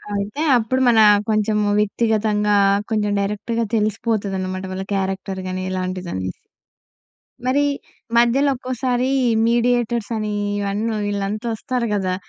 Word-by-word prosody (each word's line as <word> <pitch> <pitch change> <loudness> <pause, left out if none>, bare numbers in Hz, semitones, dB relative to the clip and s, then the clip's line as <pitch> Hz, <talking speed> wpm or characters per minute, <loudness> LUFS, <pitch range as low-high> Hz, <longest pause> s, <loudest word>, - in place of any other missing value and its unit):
అయితే, 205 +8 -3 0.2
అప్పుడు 250 +3 0
మన 230 -2 +5 0.3
కొంచెము 210 -1 +1
వ్యక్తిగతంగా 210 -1 +1 0.4
కొంచెం 210 -2 +1
డైరెక్ట్‌గా 210 +3 -2
తెలిసిపోతదనమాట. 200 -3 -1
వాళ్ళ 190 - -4
క్యారెక్టర్ 190 0 -2
గాని 185 0 -3
ఇలాంటిదనేసి. 185 - -3 1.1
మరి 275 +3 +2 0.5
మధ్యలో 245 +4 +4
ఒక్కోసారీ 255 0 -1 0.4
మీడియేటర్స్ 240 -1 +1
అనీ 215 -1 -2 0.3
ఇవన్నీ 210 +3 -1
వీళ్ళంతా 205 +2 -2
వస్తారు 240 +1 -2
గదా! 185 -2 -1
210 Hz, 105 wpm, -21 LUFS, 195-235 Hz, 1.1 s, మన